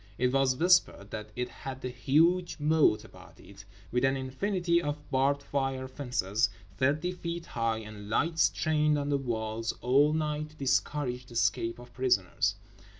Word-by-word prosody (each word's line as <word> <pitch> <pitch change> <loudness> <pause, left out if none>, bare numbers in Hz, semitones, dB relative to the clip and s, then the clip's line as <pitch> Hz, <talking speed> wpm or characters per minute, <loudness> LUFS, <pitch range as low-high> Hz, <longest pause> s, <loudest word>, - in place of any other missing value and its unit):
It 125 0 +2
was 135 -1 +3
whispered 170 - +3
that 105 -1 -6
it 125 0 -2
had 130 +1 -8
a - - -1
huge 165 +8 +2
moat 150 -6 +3
about - - -16
it, - - -14 0.3
with 125 +1 +1
an 135 0 +3
infinity 170 +6 0
of 145 -2 -2
barbed 140 +2 +2
wire 135 -2 -1
fences 120 -6 0 0.3
thirty 145 - +1
feet 170 -1 -5
high, 115 -4 -1
and 105 -1 -10
lights 160 +8 +2
trained 150 -1 +1
on 145 0 -2
the 140 - +2
walls 115 -3 -2
all 140 +5 +4
night 150 -1 -1
to 155 - -19
discourage 130 -2 -1
the 120 - -13
escape 115 0 0
of 120 0 -13
prisoners. 120 -8 +1
135 Hz, 160 wpm, -29 LUFS, 120-150 Hz, 0.3 s, all